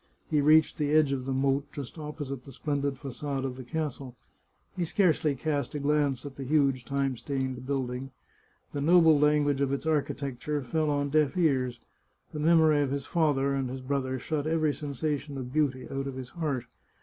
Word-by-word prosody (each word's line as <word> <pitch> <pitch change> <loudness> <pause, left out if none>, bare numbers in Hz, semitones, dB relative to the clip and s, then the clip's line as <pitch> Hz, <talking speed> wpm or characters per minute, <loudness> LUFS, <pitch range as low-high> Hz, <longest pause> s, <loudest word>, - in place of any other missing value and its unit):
He 150 -2 +3
reached 155 +2 +4
the 145 -1 +1
edge 155 -3 +4
of 130 -2 -2
the - - -1
moat, 135 +1 0
just 140 +3 -7
opposite 145 -4 -5
the 135 - -11
splendid 140 0 -2
facade 135 0 -4
of 130 -2 -3
the 130 - -8
castle. 135 -2 -4 0.6
He 180 - -1
scarcely 160 -4 +2
cast 145 -1 -2
a - - -1
glance 145 -2 +1
at 140 -1 -8
the 140 - -5
huge 135 -2 +2
time 140 -1 0
stained 130 -1 -3
building. 130 -1 -2 0.6
The 145 - -2
noble 160 -1 +6
language 145 -1 +3
of 140 -1 +1
its 140 +2 -2
architecture 145 -2 -1
fell 155 +5 0
on 145 -1 0
deaf 155 +2 +2
ears; 130 -8 +1 0.5
the 150 - -4
memory 160 -1 +5
of 140 - 0
his 140 0 -3
father 145 -4 +1
and 135 -2 -1
his 130 +1 -5
brother 130 0 -1
shut 150 +3 -2
every 155 -2 +2
sensation 145 0 -3
of 125 -1 -6
beauty 140 -4 0
out 135 0 -3
of 135 - -5
his 130 -1 -7
heart. 145 -7 -2
140 Hz, 185 wpm, -28 LUFS, 135-150 Hz, 0.6 s, noble